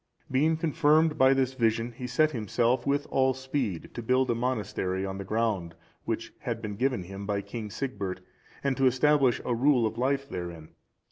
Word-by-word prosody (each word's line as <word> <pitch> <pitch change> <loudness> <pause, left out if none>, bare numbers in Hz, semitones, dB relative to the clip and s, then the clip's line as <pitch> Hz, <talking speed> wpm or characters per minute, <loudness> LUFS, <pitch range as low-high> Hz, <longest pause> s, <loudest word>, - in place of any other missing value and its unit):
(380) 130 - +2
Being 160 +2 +3
confirmed 155 -1 +3
by 130 0 +6
this 130 -1 +1
vision, 115 -1 +1
he 125 +1 -6
set 155 +4 +2
himself 120 +2 0
with 145 +1 +1
all 130 -1 +3
speed 130 - -3
to 120 - -5
build 130 +2 +2
a - - +3
monastery 105 -6 -2
on 95 0 -5
the - - -4
ground 100 -5 -1 0.3
which - - -3
had 115 -1 -3
been 105 -2 -5
given 125 -3 0
him 95 +2 -8
by 100 -1 0
King 110 +1 -6
Sigbert, 100 -6 -4 0.4
and 140 -1 +1
to 135 -1 +4
establish 135 -1 +3
a 125 - 0
rule 125 0 +3
of 110 +1 -3
life 135 +2 0
therein. 85 - -6
125 Hz, 190 wpm, -28 LUFS, 105-135 Hz, 0.4 s, by